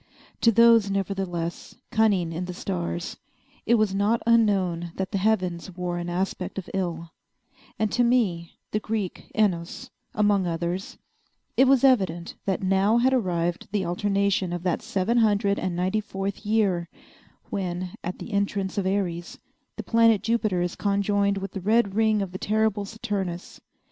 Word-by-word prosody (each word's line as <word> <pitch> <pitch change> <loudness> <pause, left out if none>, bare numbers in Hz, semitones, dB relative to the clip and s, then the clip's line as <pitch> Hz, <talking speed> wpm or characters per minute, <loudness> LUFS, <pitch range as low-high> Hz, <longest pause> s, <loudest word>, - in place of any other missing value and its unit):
To 230 - +5
those, 230 -2 +6
nevertheless, 190 -4 -3 0.2
cunning 200 -7 +2
in 175 +3 -3
the 180 0 -6
stars, 85 - -4 0.5
it 235 - +5
was 215 -3 +2
not 205 +4 +2
unknown 190 -7 +2
that 190 -1 -3
the 200 - 0
heavens 185 -4 0
wore 175 -1 -2
an 175 0 -4
aspect 185 +1 -3
of 190 - -5
ill; 170 -3 -3 0.7
and 215 -2 0
to 245 - +2
me, 205 -9 +1 0.2
the 215 - 0
Greek 215 -4 -4
Oinos, 180 -6 -1 0.2
among 205 -3 +2
others, 170 +3 -3 0.6
it 265 - +5
was 270 -1 +4
evident 190 -10 +2
that 195 -1 -1
now 195 +4 +3
had 255 +2 +3
arrived 175 -7 -1
the 200 -3 0
alternation 195 +1 0
of 175 -1 -4
that 180 -2 0
seven 220 +1 0
hundred 205 -2 +2
and 185 -2 -2
ninety 185 +4 0
fourth 195 0 -5
year 195 -6 +1 0.6
when, 180 -2 -3
at 180 - -4
the 225 - -8
entrance 200 -1 -1
of 190 - -1
Aries, 180 -3 -2 0.4
the - - -5
planet 230 -3 +4
Jupiter 215 -5 +1
is 175 - -3
conjoined 200 0 +1
with 195 0 -5
the 195 - -6
red 215 +1 +2
ring 215 -1 +2
of 190 - -6
the 185 - -6
terrible 215 -1 0
Saturnus. 195 -4 -5
195 Hz, 160 wpm, -25 LUFS, 180-215 Hz, 0.7 s, those